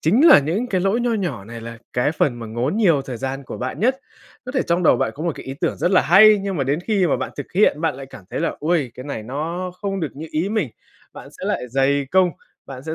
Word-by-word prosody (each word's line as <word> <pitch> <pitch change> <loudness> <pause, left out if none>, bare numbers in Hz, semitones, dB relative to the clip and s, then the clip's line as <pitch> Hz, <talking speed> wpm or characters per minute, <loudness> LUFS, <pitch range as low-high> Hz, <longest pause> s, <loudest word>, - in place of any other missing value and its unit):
chính 230 - +4
là 310 - +9
những 170 - -1
cái 185 -5 0
lỗi 195 +5 +1
nho 240 -1 0
nhỏ 170 - -3
này 115 +2 -9
là 115 0 -8
cái 125 +5 +1
phần 140 -5 +1
mà 115 - -7
ngốn 120 - -2
nhiều 170 -11 +3
thời 130 -3 -6
gian 135 +2 -4
của - - -7
bạn 130 +8 -4
nhất. 260 +4 +1 0.5
Có 250 - -5
thể 260 - +1
trong 175 +1 0
đầu - - +5
bạn - - 0
có 150 - -7
một 170 - 0
cái - - -10
ý 135 - -5
tưởng 170 - 0
rất 175 - 0
là 185 - +5
hay, 210 +5 +7
nhưng 195 -3 -3
mà 135 - 0
đến 145 +5 0
khi 195 -2 +1
mà 145 - +1
bạn - - -4
thực 145 - -7
hiện, 185 -6 +3
bạn 165 - 0
lại 135 0 -9
cảm 100 -8 -13
thấy - - -3
là, - - -1
ôi, 155 -5 0
cái 130 - -9
này 140 -7 -5
nó 165 +9 -4
không 195 -1 -2
được 160 - -1
như 160 +2 -6
ý 165 +6 -1
mình. 205 - -1 0.4
Bạn - - -11
sẽ - - -6
lại - - -1
dày 135 +2 +1
công, 185 -1 +4 0.4
bạn 130 -1 -9
sẽ 160 - -3
160 Hz, 285 wpm, -21 LUFS, 135-195 Hz, 0.5 s, là